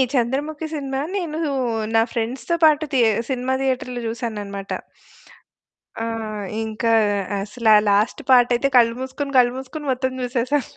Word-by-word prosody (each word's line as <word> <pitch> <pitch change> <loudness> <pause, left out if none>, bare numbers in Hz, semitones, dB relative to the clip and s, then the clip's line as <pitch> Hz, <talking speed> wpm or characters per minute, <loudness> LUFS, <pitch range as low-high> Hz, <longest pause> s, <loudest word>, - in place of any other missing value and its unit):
Chandramukhi 290 +6 -1
cinema 270 -2 -3 0.2
నేను 325 -3 -3 0.5
నా 225 - +6
ఫ్రెండ్స్‌తో 255 +8 -2
పాటు 310 0 +4
తే 250 - +4 0.3
సినిమా 260 0 -1
థియేటర్‌లో 250 -2 -2
చూశాననమాట. 210 -4 -5 1.3
ఆ! - - -1 0.6
ఇంక 220 0 -5 0.6
అసలు 220 +3 -4
ఆ - - +9
లాస్ట్ 205 +2 +2
పార్ట్ 245 -1 +6
అయితే 260 +3 +1
కళ్ళు 230 -1 +5
మూసుకొని, 270 +2 -4
కళ్ళు 245 -1 +5
మూసుకొని 265 +3 -7
మొత్తం 260 0 -1
చూసేసాను. 250 +2 -1
255 Hz, 130 wpm, -22 LUFS, 230-275 Hz, 1.3 s, ఆ